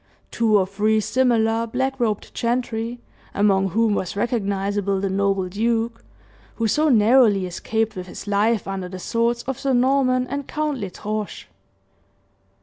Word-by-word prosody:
Two 220 -3 +3
or 190 - +2
three 210 +3 +1
similar 230 -1 +1
black 265 +3 -2
robed 215 -4 -1
gentry, 235 0 -2 0.4
among 195 -1 +3
whom 220 +3 +2
was 190 -2 -2
recognizable 200 -3 -1
the 195 0 -1
noble 195 -1 0
duke 230 +4 -1 0.5
who 230 - 0
so 305 +8 +2
narrowly 220 -4 +4
escaped 220 +5 -2
with 185 0 -6
his - - -9
life 210 +1 +1
under 190 -2 -4
the 185 - -7
swords 230 +5 -1
of 265 -1 -4
Sir 270 -1 0
Norman 255 0 +2
and 280 +1 -5
Count 300 -3 -2
L'Estrange. 210 +1 -5
220 Hz, 145 wpm, -22 LUFS, 200-240 Hz, 0.5 s, narrowly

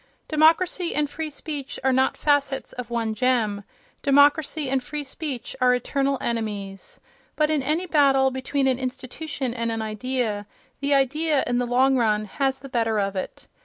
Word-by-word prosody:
Democracy 335 +3 +3
and 295 -1 0
free 315 +1 -4
speech 290 -2 -6
are 265 0 +3
not 260 +1 +2
facets 285 -2 0
of 250 -1 -7
one 230 -2 -1
gem; 220 -4 +1 0.4
democracy 290 +1 +3
and 265 0 0
free 295 +3 -5
speech 275 -2 -5
are 250 0 +5
eternal 275 +2 0
enemies. 205 -4 -4 0.4
But 305 0 +2
in 305 -2 +1
any 310 +7 -1
battle 275 -5 +4
between 265 +2 -1
an 260 -1 +1
institution 260 +1 -4
and 230 -1 -2
an 225 -1 -2
idea, 215 -1 -2 0.3
the 280 0 +2
idea, 290 +2 +2
in 245 0 0
the 245 - -1
long 260 +2 +3
run, 215 -3 +1
has 265 +5 -1
the 275 - -8
better 230 -4 0
of 195 0 -1
it. 185 - -5
265 Hz, 165 wpm, -24 LUFS, 235-290 Hz, 0.4 s, are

